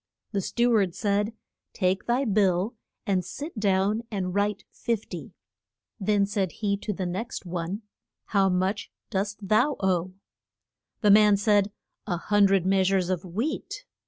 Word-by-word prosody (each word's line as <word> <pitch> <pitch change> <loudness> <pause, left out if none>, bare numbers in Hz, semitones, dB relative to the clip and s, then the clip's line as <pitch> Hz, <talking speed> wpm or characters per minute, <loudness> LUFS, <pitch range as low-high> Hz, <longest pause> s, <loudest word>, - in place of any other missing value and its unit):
The 200 - 0
stew 240 +5 +1
ard 195 -6 +2
said, 205 +1 0 0.4
Take 185 -1 0
thy 250 +3 +2
bill, 200 0 +2 0.3
and 190 -2 +1
sit 285 - -6
down 200 +2 +2
and 185 -4 -2
write 205 0 0
fif 230 -3 -2
ty. - - -7 0.7
Then 205 0 +2
said 195 -3 -1
he 205 -2 0
to 210 - -4
the 190 -2 -3
next 190 +5 -4
one, 175 +4 -4 0.4
How 195 -2 +2
much 185 +3 -1 0.2
dost 205 0 -2
thou 215 +9 +3
owe? 185 -1 0 0.9
The 210 -2 +5
man 210 0 +7
said, 205 -1 +3 0.4
A 175 -4 0
hun 205 +3 +3
dred 195 -2 +2
mea 190 0 +3
sures 185 -1 +2
of 180 -2 -1
wheat. 290 - -4
200 Hz, 155 wpm, -26 LUFS, 185-210 Hz, 0.9 s, man